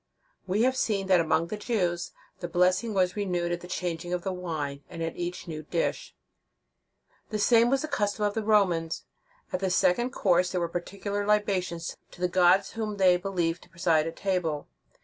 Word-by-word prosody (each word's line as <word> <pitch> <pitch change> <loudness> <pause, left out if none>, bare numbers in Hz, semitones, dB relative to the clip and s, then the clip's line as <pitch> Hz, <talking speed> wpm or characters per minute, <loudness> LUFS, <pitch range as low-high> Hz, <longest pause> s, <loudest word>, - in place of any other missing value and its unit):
We 200 +5 +2
have 260 +1 +3
seen 205 -6 0
that 185 -2 +6
among 165 0 +2
the 215 - -3
Jews, 180 -6 -1 0.3
the 175 - -4
blessing 185 +6 +2
was 185 -1 +2
renewed 180 -4 -1
at 175 0 -2
the 180 - -9
changing 175 -1 -3
of 180 -1 -2
the 190 - -2
wine, 155 -6 -4
and 165 -2 -5
at 165 - -3
each 175 0 -5
new 155 -2 -5
dish. 170 - -2 1.1
The 215 - -2
same 230 +3 +5
was 270 +2 +1
the - - -2
custom 210 -7 0
of 205 - 0
the 225 - -1
Romans. 185 -7 +2 0.5
At 185 - 0
the 190 0 0
second 180 +6 +2
course 180 -6 +2
there 180 - -1
were 170 - 0
particular 200 +4 -3
libations 195 -5 0
to - - -16
the 180 - +2
gods 180 +1 +4
whom 215 -2 -4
they 185 -2 +5
believed 180 -2 -1
to - - -18
preside 170 -3 +2
at 165 - -5
table. 175 -6 -1
180 Hz, 190 wpm, -28 LUFS, 175-205 Hz, 1.1 s, that